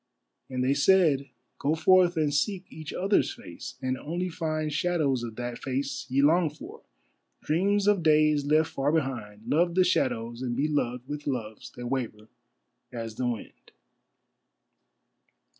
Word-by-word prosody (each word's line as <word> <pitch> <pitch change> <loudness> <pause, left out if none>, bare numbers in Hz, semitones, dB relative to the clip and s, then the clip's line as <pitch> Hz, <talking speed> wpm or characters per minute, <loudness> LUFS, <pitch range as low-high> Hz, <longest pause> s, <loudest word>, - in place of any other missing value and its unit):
And 125 -1 -2
they 130 +2 +3
said, 145 -3 +3 0.3
"Go 150 +3 +1
forth 180 +1 +4
and 150 -2 +1
seek 185 +6 0
each 155 -1 -8
other's 195 +3 +1
face, - - -9
and 130 0 -1
only 175 +4 -3
find 155 -2 -2
Shadows 150 -5 +1
of 115 -2 -6
that 120 0 -5
face 135 +1 -3
ye 135 +2 +2
long 165 +2 +4
for, 150 +1 -11 0.6
dreams 195 +6 +1
of 205 -3 +4
days 155 -2 +4
left 155 +2 +2
far 140 +2 0
behind, 120 -9 -2
Love 170 +3 +2
the 185 - +5
shadows 120 -9 0
and 125 -2 -2
be 145 - +1
loved 125 -4 -2
with 145 0 -6
loves 110 -6 -4
that 125 - -8
waver 115 -4 -4 0.6
as 115 -2 -5
the 125 +3 -2
wind." 120 -3 -6
145 Hz, 150 wpm, -27 LUFS, 125-165 Hz, 0.6 s, the